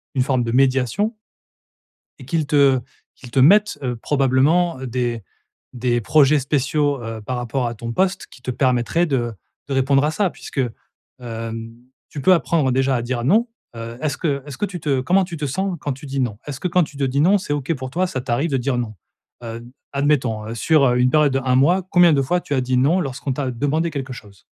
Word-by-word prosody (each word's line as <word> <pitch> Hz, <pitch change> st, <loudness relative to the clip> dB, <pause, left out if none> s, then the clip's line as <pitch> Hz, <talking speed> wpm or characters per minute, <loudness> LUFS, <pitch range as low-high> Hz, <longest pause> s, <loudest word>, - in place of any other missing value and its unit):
une 130 Hz, -, +2 dB
forme 130 Hz, -2 st, +1 dB
de 115 Hz, -, -2 dB
médiation 135 Hz, -, +2 dB, 1.0 s
et 130 Hz, -, -11 dB
qu'ils 155 Hz, +2 st, -1 dB
te 140 Hz, -3 st, +4 dB, 0.4 s
qu'ils 125 Hz, -2 st, -13 dB
te 135 Hz, -, +1 dB
mettent, 205 Hz, +10 st, +5 dB
heu, 125 Hz, -2 st, -2 dB
probablement, 140 Hz, +6 st, +2 dB
heu, 130 Hz, -, -5 dB
des 120 Hz, -2 st, -2 dB, 0.5 s
des 120 Hz, -1 st, 0 dB
projets 145 Hz, +4 st, +4 dB
spéciaux, 140 Hz, 0 st, 0 dB
heu, 115 Hz, -1 st, -6 dB
par 125 Hz, +4 st, -4 dB
rapport 120 Hz, +1 st, -2 dB
à 120 Hz, -, -4 dB
ton 115 Hz, +1 st, -6 dB
poste, 190 Hz, +7 st, 0 dB
qui -, -, -17 dB
te 125 Hz, -, -3 dB
permettraient 125 Hz, +5 st, +1 dB
de 120 Hz, -7 st, -1 dB, 0.4 s
de -, -, -1 dB
répondre 135 Hz, +1 st, +3 dB
à 150 Hz, -, +1 dB
ça. 190 Hz, +4 st, +1 dB
Puisque, 140 Hz, -, -5 dB, 0.6 s
hem, 115 Hz, -1 st, -6 dB, 0.4 s
tu 145 Hz, -, -6 dB
peux 185 Hz, +8 st, +5 dB
apprendre 160 Hz, -5 st, +1 dB
déjà 135 Hz, +1 st, +1 dB
à 120 Hz, -, 0 dB
dire 120 Hz, 0 st, -3 dB
«non», 215 Hz, -, +3 dB, 0.3 s
heu, 115 Hz, +1 st, -7 dB
est-ce 150 Hz, -3 st, -1 dB
que 140 Hz, -5 st, -1 dB
est-ce 145 Hz, -3 st, -8 dB
que -, -, 0 dB
tu 185 Hz, -3 st, -7 dB
te, 150 Hz, -, -4 dB
heu, 130 Hz, -2 st, +1 dB
comment 190 Hz, +7 st, +3 dB
tu 175 Hz, -2 st, -7 dB
te 150 Hz, -, -3 dB
sens 185 Hz, +6 st, -2 dB
quand 145 Hz, -, -2 dB
tu 135 Hz, +3 st, -11 dB
dis 135 Hz, 0 st, -3 dB
«Non»? 115 Hz, -5 st, -2 dB
Est-ce 140 Hz, -3 st, -5 dB
que 180 Hz, -, -1 dB
quand 180 Hz, 0 st, +3 dB
tu 150 Hz, -2 st, -9 dB
te 140 Hz, -, -2 dB
dis: 135 Hz, +2 st, 0 dB
«non», 190 Hz, +6 st, +5 dB
c'est 165 Hz, -6 st, -3 dB
OK 145 Hz, +2 st, -1 dB
pour 130 Hz, -1 st, -6 dB
toi, 185 Hz, +5 st, 0 dB
ça 130 Hz, -7 st, -4 dB
t'arrive 125 Hz, +7 st, -1 dB
de 135 Hz, -, +2 dB
dire 125 Hz, 0 st, -1 dB
«non»? 115 Hz, -3 st, -3 dB, 0.5 s
Heu, 115 Hz, 0 st, -7 dB, 0.3 s
admettons 125 Hz, -7 st, 0 dB
sur, 150 Hz, +5 st, +3 dB
heu, 125 Hz, -1 st, +3 dB
une 125 Hz, +1 st, +4 dB
période 150 Hz, -1 st, +4 dB
de 135 Hz, -, +1 dB
1 130 Hz, -1 st, +1 dB
mois, 175 Hz, +7 st, +3 dB
combien 175 Hz, -3 st, +6 dB
de 140 Hz, -, +3 dB
fois 175 Hz, +7 st, 0 dB
tu 145 Hz, -, -5 dB
as 130 Hz, -, +1 dB
dit 125 Hz, 0 st, 0 dB
«non» 145 Hz, +9 st, +3 dB
lorsqu'on 135 Hz, -2 st, -3 dB
t'a 130 Hz, -1 st, -2 dB
demandé 145 Hz, +7 st, -1 dB
quelque 135 Hz, -3 st, -5 dB
chose? 100 Hz, -8 st, -14 dB
135 Hz, 225 wpm, -21 LUFS, 125-155 Hz, 1.0 s, combien